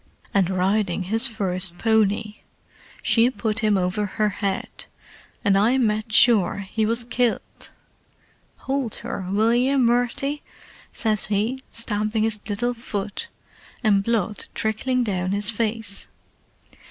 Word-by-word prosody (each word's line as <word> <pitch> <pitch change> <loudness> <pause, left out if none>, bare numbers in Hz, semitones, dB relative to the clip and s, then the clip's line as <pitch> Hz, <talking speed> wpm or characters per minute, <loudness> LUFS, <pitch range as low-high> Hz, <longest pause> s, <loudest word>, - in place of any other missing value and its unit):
"And 195 -3 +3
riding 190 0 0
his 225 +7 +1
first 185 -5 -2
pony. 215 -1 +1 0.7
She 230 +1 +4
put 225 -4 -2
him 215 -2 +2
over 190 +3 0
her 215 +2 0
head, 195 -1 -3 0.6
and 200 -1 +4
I 220 +6 +3
med 215 -3 0
sure 205 -4 +4
he 220 -1 +1
was 230 +2 +1
kilt. 240 0 -2 0.9
'Howld 265 -4 -2
her, 190 - -4
will 215 +4 +2
ye, 255 +3 +2
Murty,' 245 +3 +1 0.5
says 215 -3 +1
he, 215 +6 -1
stamping 215 -1 -1
his 220 -1 +1
little 240 +4 0
fut, 225 - -5 0.6
and 200 -3 +3
blood 215 -2 -1
trickling 245 +4 0
down 185 -3 -1
his 205 +2 +2
face. 220 -2 -3
215 Hz, 125 wpm, -23 LUFS, 200-235 Hz, 0.9 s, She